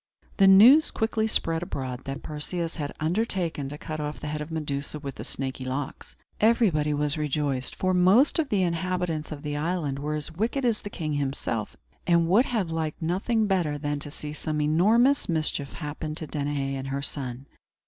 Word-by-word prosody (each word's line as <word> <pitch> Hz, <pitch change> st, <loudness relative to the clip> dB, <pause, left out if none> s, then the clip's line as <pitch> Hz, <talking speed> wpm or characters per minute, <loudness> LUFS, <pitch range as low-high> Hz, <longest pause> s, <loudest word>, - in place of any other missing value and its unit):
The 195 Hz, -, +6 dB
news 235 Hz, +11 st, +8 dB
quickly 220 Hz, 0 st, 0 dB
spread 165 Hz, -6 st, 0 dB
abroad 130 Hz, -6 st, -5 dB
that 135 Hz, +1 st, -5 dB
Perseus 165 Hz, +3 st, -3 dB
had 145 Hz, -3 st, -3 dB
undertaken 170 Hz, -4 st, -1 dB
to 145 Hz, -, -7 dB
cut 155 Hz, +1 st, -6 dB
off 150 Hz, 0 st, -4 dB
the -, -, -8 dB
head 150 Hz, 0 st, -3 dB
of 150 Hz, -, -6 dB
Medusa 150 Hz, -2 st, -3 dB
with 140 Hz, -2 st, -6 dB
the -, -, -8 dB
snaky 130 Hz, -1 st, -4 dB
locks. 130 Hz, +2 st, -5 dB, 0.2 s
Everybody 205 Hz, -10 st, +3 dB
was 150 Hz, +1 st, 0 dB
rejoiced; 145 Hz, -3 st, -1 dB
for 185 Hz, 0 st, 0 dB
most 190 Hz, -, +5 dB
of 300 Hz, -4 st, 0 dB
the 200 Hz, -4 st, +2 dB
inhabitants 175 Hz, -2 st, -1 dB
of 145 Hz, -2 st, -7 dB
the 145 Hz, -1 st, -3 dB
island 150 Hz, -3 st, -1 dB
were 150 Hz, +2 st, -2 dB
as 150 Hz, +1 st, -3 dB
wicked 225 Hz, -, -1 dB
as 230 Hz, -3 st, +1 dB
the 205 Hz, -, -6 dB
king 155 Hz, -6 st, -3 dB
himself, 135 Hz, -6 st, -2 dB, 0.3 s
and 170 Hz, -1 st, +4 dB
would 210 Hz, +9 st, +5 dB
have 210 Hz, -9 st, -1 dB
liked 160 Hz, -1 st, -2 dB
nothing 195 Hz, +7 st, +1 dB
better 175 Hz, -7 st, +1 dB
than 145 Hz, 0 st, -2 dB
to 145 Hz, -, -6 dB
see 150 Hz, 0 st, -7 dB
some 155 Hz, 0 st, -3 dB
enormous 210 Hz, -, +3 dB
mischief 155 Hz, -4 st, -1 dB
happen 150 Hz, 0 st, -5 dB
to 160 Hz, -, -3 dB
Danaë 145 Hz, -2 st, -2 dB
and 135 Hz, 0 st, -4 dB
her 140 Hz, +1 st, -3 dB
son. 130 Hz, -2 st, -4 dB
155 Hz, 190 wpm, -26 LUFS, 145-185 Hz, 0.3 s, news